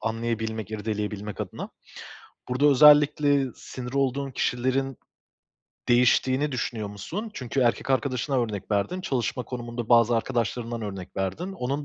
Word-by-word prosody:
anlayabilmek, 110 -1 -3
irdeleyebilmek 105 -1 -4
adına. - - -5 0.8
Burada 130 +3 +2
özellikle 145 0 +6
sinir 125 0 -8
olduğun 135 0 0
kişilerin 130 +2 -1 0.9
değiştiğini 130 +4 +3
düşünüyor 110 -4 -3
musun? 165 - -6
Çünkü 130 - -2
erkek 120 +2 +1
arkadaşını 130 +1 0
örnek 110 -5 -3
verdin, 105 - 0
çalışma 130 -6 -1
konumunda 120 -2 -5
bazı 120 -1 +5
arkadaşlarından 115 -1 -2
örnek 95 -3 -7
verdin. 100 - -2
Onun 140 -4 -3
125 Hz, 115 wpm, -26 LUFS, 110-135 Hz, 0.9 s, özellikle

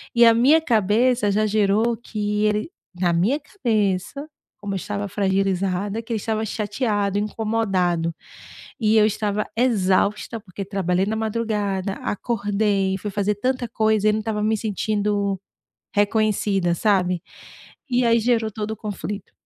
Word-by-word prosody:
e 235 - +6
a 230 - +7
minha 270 +8 +5
cabeça 225 -2 +2
já 215 +2 +2
gerou 215 +2 +2
que 210 -2 -2
ele 210 +9 0 0.3
na 175 -2 +2
minha 205 - +2
cabeça, 225 - -1 0.3
como 205 -1 -5
eu - - -1
estava 205 +2 -4
fragilizada, 195 +1 0
que 230 - -11
ele - - 0
estava 220 +1 -2
chateado, 205 -1 -1
incomodado, 195 -6 0 0.7
e 220 -1 +3
eu 215 - +6
estava 210 -1 -1
exausta, 210 -1 +1
porque 195 -1 -8
trabalhei 190 -1 0
na 215 - -2
madrugada, 210 -3 -1
acordei, 205 -3 0
fui 205 +2 -5
fazer 205 +1 0
tanta 255 +3 -1
coisa 215 -1 +2
e - - +5
não 215 - 0
estava 215 -1 -2
me 220 0 +1
sentindo 205 -2 -1 0.5
reconhecida, 205 -3 +1
sabe, 180 -3 +1 0.7
e 245 -1 +2
aí 230 0 +4
gerou 225 -1 +1
todo 215 +1 -4
o 220 - -5
conflito. 205 -1 -6
210 Hz, 140 wpm, -22 LUFS, 195-220 Hz, 0.7 s, a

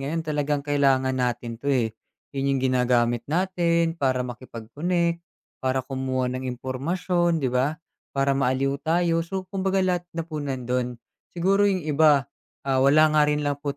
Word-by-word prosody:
ngayon, 160 +4 -3
talagang 145 -2 -1
kailangan 135 -2 +2
natin 120 -2 -2
to 140 - -3
eh. 120 -5 +1 0.4
'Yon 135 0 0
yung - - -2
ginagamit 120 -2 +2
natin 170 -1 +1
para 130 -5 0
makipag-connect 145 +9 -2 0.4
para 130 -1 0
kumuha 130 -1 -2
ng 130 0 -4
impormasyon 165 +8 -1
,'di 125 - 0
ba? 135 +5 +1 0.4
Para 135 0 +2
maaliw 135 +1 0
tayo, 165 +2 +1
so, 190 +3 -4
kumbaga 190 0 +1
lahat 180 -1 -1
na 165 - -2
po 155 -2 -5
nandun. 125 -3 -2 0.4
Siguro 195 +4 +3
yung 185 -5 -1
iba, 150 -2 +4 0.4
ah, 135 -1 +1
wala 150 +3 +5
nga 150 - +5
rin 150 0 0
lang 145 0 -1
po 140 -1 -3
140 Hz, 155 wpm, -25 LUFS, 130-165 Hz, 0.4 s, wala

